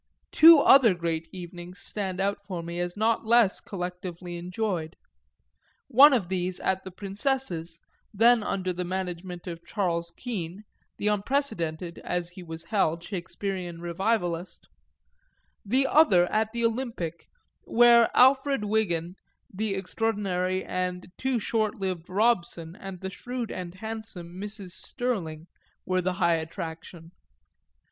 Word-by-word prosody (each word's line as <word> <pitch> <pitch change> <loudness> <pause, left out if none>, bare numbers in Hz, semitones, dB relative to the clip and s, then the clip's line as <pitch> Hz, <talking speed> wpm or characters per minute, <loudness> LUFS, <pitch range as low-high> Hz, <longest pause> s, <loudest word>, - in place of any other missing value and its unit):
Two 325 +1 +9
other 265 -7 +6
great 165 -1 -2
evenings 175 0 -9
stand 190 -3 -3
out 200 +1 0
for 180 -4 -5
me 170 +1 -5
as 175 +2 -3
not 225 +1 +2
less 230 -3 +4
collectively 180 -1 -6
enjoyed, 180 -2 -3 0.9
one 280 +5 +8
of 230 -9 +1
these 180 0 -2
at 190 0 0
the 190 - -7
Princess's, 195 -4 -2 0.3
then 230 +3 +5
under 185 -3 -2
the 180 +1 -3
management 180 -1 -5
of 170 -2 -7
Charles 170 -3 -2
Kean, 200 -5 -5 0.3
the - - -5
unprecedented 195 - -1
(as 175 -1 -2
he 180 +1 -11
was 165 -1 -7
held) 170 -3 0
Shakespearean 180 -1 -5
revivalist, 175 0 -2 1.0
the 255 +6 +2
other 235 - +5
at 220 0 +1
the 235 0 0
Olympic, 225 -9 -3 0.4
where 235 0 +6
Alfred 265 -2 +5
Wigan, 180 -6 0 0.4
the 205 +1 -1
extraordinary 190 -2 -1
and 180 0 -3
too 265 -1 0
short 215 -1 0
lived 185 -4 -4
Robson 185 -5 0
and 195 -2 -9
the 190 0 -4
shrewd 245 +1 -5
and 180 -1 -6
handsome 220 -5 -7
Mrs. 200 0 -6
Stirling 175 -9 -3 0.4
were 185 0 +1
the 185 +1 -1
high 170 -2 +2
attraction. 165 0 -7
185 Hz, 130 wpm, -27 LUFS, 175-220 Hz, 1.0 s, Two